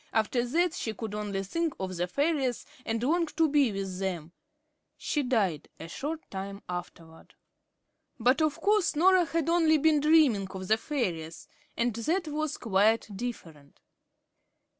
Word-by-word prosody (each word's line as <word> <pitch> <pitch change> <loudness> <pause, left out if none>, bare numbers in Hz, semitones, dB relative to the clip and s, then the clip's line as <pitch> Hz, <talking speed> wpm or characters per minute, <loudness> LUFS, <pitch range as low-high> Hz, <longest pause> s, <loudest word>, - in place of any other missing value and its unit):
After 225 +2 +1
that, 330 +7 +1
she 220 -10 -4
could 220 0 -6
only 205 -2 -3
think 330 - -2
of 185 -1 -4
the 175 +1 -1
fairies, 280 - 0 0.2
and 225 +1 -1
long 335 +5 +2
to 320 +1 +1
be 285 -5 +3
with 195 -2 -4
them. 175 -4 -3 0.7
She 295 - -1
died 205 - 0
a 165 - -7
short 305 - -4
time 195 +1 -6
afterward. 170 -2 -8 0.8
But, 250 +7 +3
of 310 -2 +1
course, 415 -5 +2
Norah 365 +3 +5
had 325 +1 -1
only 330 -2 +4
been 305 0 +3
dreaming 290 -10 +4
of 190 -1 -7
the 220 - +4
fairies. 175 - -3 0.3
That 245 - 0
was 300 0 -2
quite 215 0 +1
different. 165 -11 -7
240 Hz, 145 wpm, -29 LUFS, 195-310 Hz, 0.8 s, Norah